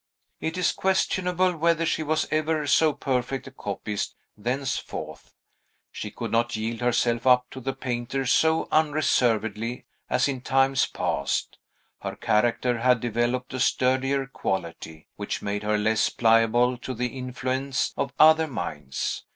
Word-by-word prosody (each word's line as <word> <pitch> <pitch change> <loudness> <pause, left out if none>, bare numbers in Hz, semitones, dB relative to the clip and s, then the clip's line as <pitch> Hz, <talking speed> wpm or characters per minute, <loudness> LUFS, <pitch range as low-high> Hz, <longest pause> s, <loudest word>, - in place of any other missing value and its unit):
It 160 +2 -3
is 180 - +2
questionable 185 -1 +1
whether 165 +1 +2
she 160 - 0
was 155 0 0
ever 155 0 0
so 155 +2 +4
perfect 135 -2 -2
a 135 - -10
copyist 105 -3 -4 0.2
thenceforth. 125 +5 -4 0.6
She - - -6
could - - -6
not 120 +1 +1
yield 110 +2 -3
herself 120 0 +1
up 125 -1 +5
to 130 - -7
the 135 +1 -3
painter 125 +2 -3
so 160 +5 +3
unreservedly 120 -7 +1 0.2
as 125 - +2
in 135 -3 -3
times 135 +1 +2
past; - - -2 0.4
her - - -5
character 120 +2 +1
had 125 0 +3
developed 120 +2 -1
a 130 - -3
sturdier 130 +2 +1
quality, 85 -9 -5
which 105 - -4
made 100 0 -2
her 105 0 +1
less 110 +1 +2
pliable 115 +2 +3
to 130 +1 -5
the 125 +2 -3
influence 130 +1 -2
of 135 - -2
other 160 +1 +6
minds. 75 - -4
125 Hz, 140 wpm, -25 LUFS, 115-140 Hz, 0.6 s, other